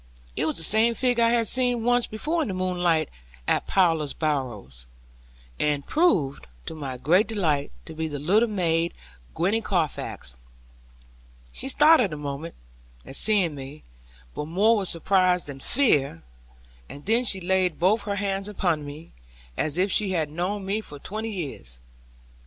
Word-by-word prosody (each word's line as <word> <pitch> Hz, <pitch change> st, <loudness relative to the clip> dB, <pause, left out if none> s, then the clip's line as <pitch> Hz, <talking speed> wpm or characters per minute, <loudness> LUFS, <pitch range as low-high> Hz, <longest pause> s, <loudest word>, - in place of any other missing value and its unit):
It -, -, 0 dB
was 155 Hz, -, -2 dB
the 165 Hz, -, +3 dB
same 220 Hz, +6 st, +3 dB
figure 245 Hz, -2 st, +2 dB
I 230 Hz, -, +4 dB
had 235 Hz, -1 st, +2 dB
seen 245 Hz, 0 st, +2 dB
once 245 Hz, 0 st, +2 dB
before 310 Hz, +10 st, -2 dB
in 305 Hz, -, -1 dB
the 190 Hz, -, -3 dB
moonlight, 175 Hz, -4 st, +1 dB, 0.4 s
at -, -, +1 dB
Plover's 165 Hz, -6 st, +2 dB
Barrows; 120 Hz, -, -3 dB, 0.7 s
and 145 Hz, -2 st, 0 dB
proved, 180 Hz, -, +1 dB, 0.2 s
to -, -, -6 dB
my 140 Hz, -5 st, -6 dB
great 175 Hz, -, +3 dB
delight, 160 Hz, -, 0 dB
to -, -, -9 dB
be 160 Hz, 0 st, -3 dB
the 145 Hz, -2 st, -5 dB
little 205 Hz, +11 st, +2 dB
maid 170 Hz, -4 st, 0 dB, 0.4 s
Gwenny 195 Hz, +7 st, +1 dB
Carfax. 155 Hz, -, -3 dB, 1.1 s
She 270 Hz, -, -3 dB
started 295 Hz, -, +5 dB
a 150 Hz, -, -5 dB
moment, 145 Hz, +3 st, -6 dB, 0.5 s
at -, -, -8 dB
seeing 195 Hz, -5 st, +2 dB
me, 140 Hz, +2 st, -9 dB, 0.5 s
but 150 Hz, -, -5 dB
more 205 Hz, +8 st, +3 dB
with 200 Hz, -3 st, -1 dB
surprise 180 Hz, +1 st, +2 dB
than 140 Hz, -2 st, -8 dB
fear; 140 Hz, -, +1 dB, 0.7 s
and 145 Hz, -, -11 dB
then 230 Hz, +4 st, +3 dB
she 200 Hz, -5 st, +2 dB
laid 185 Hz, -2 st, +1 dB
both 200 Hz, +5 st, +2 dB
her 200 Hz, -1 st, -2 dB
hands 195 Hz, -1 st, -2 dB
upon 175 Hz, -7 st, -1 dB
mine, 145 Hz, +3 st, -10 dB, 0.4 s
as 155 Hz, -, -1 dB
if 190 Hz, +2 st, +2 dB
she 200 Hz, -3 st, +2 dB
had 155 Hz, -4 st, -1 dB
known 190 Hz, +5 st, -3 dB
me 205 Hz, +3 st, -1 dB
for 145 Hz, -8 st, -9 dB
twenty 215 Hz, +9 st, -5 dB
years. 135 Hz, -, -6 dB
180 Hz, 160 wpm, -25 LUFS, 150-215 Hz, 1.1 s, started